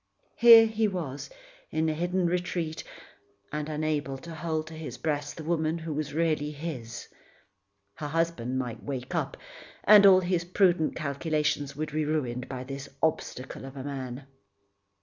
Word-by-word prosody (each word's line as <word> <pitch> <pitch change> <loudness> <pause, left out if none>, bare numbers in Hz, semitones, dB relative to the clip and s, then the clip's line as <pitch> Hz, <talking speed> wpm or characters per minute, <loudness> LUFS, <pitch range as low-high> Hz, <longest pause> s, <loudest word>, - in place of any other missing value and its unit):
Here 230 -1 +9
he 220 0 +1
was, 165 -9 -4 0.4
in 160 +1 0
a 155 - +1
hidden 175 +3 0
retreat, 175 -2 -1 0.7
and 150 0 -3
unable 150 -3 -1
to 165 +5 -9
hold 160 -1 -2
to 160 - -10
his 155 -6 -7
breast 145 +1 -2
the 160 - -6
woman 160 0 0
who 160 -1 -5
was 150 0 -3
really 155 -1 +1
his. 145 -6 -6 0.9
Her 150 - -5
husband 145 -6 -1
might 120 -3 -4
wake 130 -3 -5
up - - -2 0.5
and 205 -1 +9
all 185 -1 +7
his 175 -1 0
prudent 175 -2 +2
calculations 150 -1 -1
would 155 +1 -3
be 155 +1 0
ruined 130 -5 -2
by 130 -1 -5
this 135 +1 -7
obstacle 130 -5 -2
of 135 +1 -9
a 130 - -5
man. 135 -2 -5
155 Hz, 155 wpm, -28 LUFS, 140-170 Hz, 0.9 s, Here